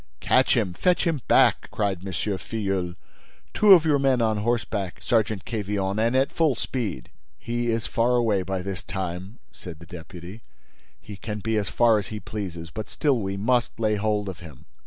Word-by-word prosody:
"Catch - - +3
him! 90 - 0
Fetch 180 - +1
him 160 -5 0
back!" - - +4
cried 100 -4 -1
M. 95 - -5
Filleul. 95 -1 -2 0.6
"Two 210 -2 +7
of 170 -4 +6
your 150 -3 +3
men 135 -2 +3
on 110 -2 +1
horseback, 105 -4 -2
Sergeant 110 -5 0
Quevillon, 105 -2 -2
and 115 +3 +2
at 135 +1 +2
full 155 -5 +2
speed!" 110 - -4 0.3
"He 120 0 -3
is 115 -1 0
far 120 +2 +1
away 110 -5 +2
by 95 0 -3
this 95 -2 -4
time," 95 +3 -5
said 85 -3 -10
the 85 - -13
deputy. 90 +5 -10 0.6
"He 105 -2 -10
can 105 +1 -5
be 110 +1 -2
as 105 -3 0
far 115 -2 +4
as 100 - -5
he 110 - -6
pleases, 95 -6 -6
but 105 0 -6
still 140 -5 +1
we 95 -1 -3
must 120 +3 0
lay 110 -1 +2
hold 105 0 0
of 95 -4 -6
him." 80 -6 -13
105 Hz, 185 wpm, -25 LUFS, 95-115 Hz, 0.6 s, Two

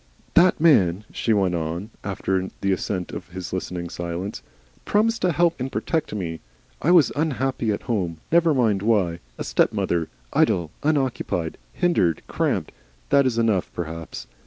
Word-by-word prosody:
"That 175 0 +5
man," 105 - +4
she 115 - -1
went 95 -4 +2
on, 85 +6 -3
after 95 -1 -1
the 100 - +1
assent 95 -1 -2
of - - -7
his 90 0 -7
listening 90 -1 -3
silence, 85 +3 -4 0.4
"promised 225 +2 +2
to 180 - +3
help 170 0 +2
and 130 +1 -3
protect 160 +1 -1
me. 85 -5 -4 0.4
I 160 - +1
was 175 -4 +6
unhappy 135 -6 0
at 100 - -3
home 90 -8 -1
never 170 0 +5
mind 110 -6 +2
why. 100 -6 +2 0.2
A - - -3
stepmother 85 -2 +1 0.2
Idle, 85 -3 +2
unoccupied, 130 - -1
hindered, 90 - +1
cramped, - - -1 0.4
that 140 -1 +5
is 120 -3 -1
enough, 110 -5 +1
perhaps. 80 -1 -5
100 Hz, 150 wpm, -24 LUFS, 85-140 Hz, 0.4 s, was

